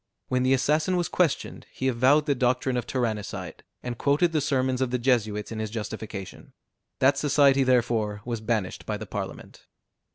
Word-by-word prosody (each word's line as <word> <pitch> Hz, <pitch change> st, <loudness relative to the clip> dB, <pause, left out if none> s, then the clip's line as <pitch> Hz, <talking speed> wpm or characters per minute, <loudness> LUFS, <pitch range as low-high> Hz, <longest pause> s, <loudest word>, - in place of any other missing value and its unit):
When 125 Hz, 0 st, +1 dB
the 130 Hz, +1 st, +4 dB
assassin 150 Hz, +7 st, +1 dB
was 175 Hz, -, 0 dB
questioned, 170 Hz, -6 st, -1 dB
he 130 Hz, -, -3 dB
avowed 130 Hz, +4 st, +3 dB
the 145 Hz, -, +2 dB
doctrine 125 Hz, 0 st, 0 dB
of 125 Hz, -, -2 dB
tyrannicide, 115 Hz, -5 st, -3 dB, 0.2 s
and 120 Hz, -1 st, -5 dB
quoted 150 Hz, +5 st, +2 dB
the 155 Hz, -2 st, +1 dB
sermons 130 Hz, -2 st, 0 dB
of 130 Hz, -, +1 dB
the 125 Hz, -, 0 dB
Jesuits 110 Hz, -5 st, 0 dB
in 110 Hz, -, -5 dB
his 110 Hz, -1 st, -3 dB
justification. 105 Hz, -3 st, -7 dB, 0.4 s
That 135 Hz, +2 st, +3 dB
society 140 Hz, -2 st, +4 dB
therefore 115 Hz, -5 st, +1 dB
was 120 Hz, -2 st, -3 dB
banished 110 Hz, -4 st, -2 dB
by 105 Hz, -, -2 dB
the 110 Hz, -, -7 dB
Parliament. 100 Hz, -1 st, -7 dB
125 Hz, 170 wpm, -26 LUFS, 110-135 Hz, 0.4 s, the